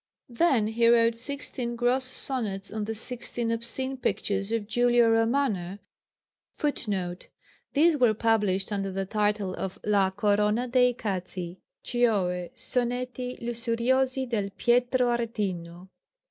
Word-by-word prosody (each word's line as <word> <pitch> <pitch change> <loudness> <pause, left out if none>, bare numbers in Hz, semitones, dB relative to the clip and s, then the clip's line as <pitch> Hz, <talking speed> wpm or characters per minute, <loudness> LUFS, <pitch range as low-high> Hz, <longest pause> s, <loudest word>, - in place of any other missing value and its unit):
Then 240 -2 +2
he 230 +2 +2
wrote 230 -1 +4
sixteen 250 -1 -3
gross 245 +2 +1
sonnets 220 -7 -3
on 215 -1 -2
the 225 +1 -3
sixteen 235 0 -2
obscene 250 +4 -2
pictures 200 -4 -1
of 225 -2 -1
Giulio 240 +1 +3
Romano 225 -5 +1 0.8
[Footnote: 195 -11 -2 0.5
These 310 +2 +4
were 240 -5 +4
published 210 -3 +1
under 195 -1 -2
the 195 +1 -2
title 205 -1 0
of 190 0 -5
_La 195 -2 +2
corona 210 +4 +2
de 250 0 +4
i - - -2
cazzi, 185 -5 -4 0.2
cioë, 190 -8 +1
sonetti 250 0 -3
lussuriosi 250 +3 0
del 210 -4 -1
Pietro 245 +1 +2
Aretino. 190 -6 -4
230 Hz, 120 wpm, -27 LUFS, 200-245 Hz, 0.8 s, wrote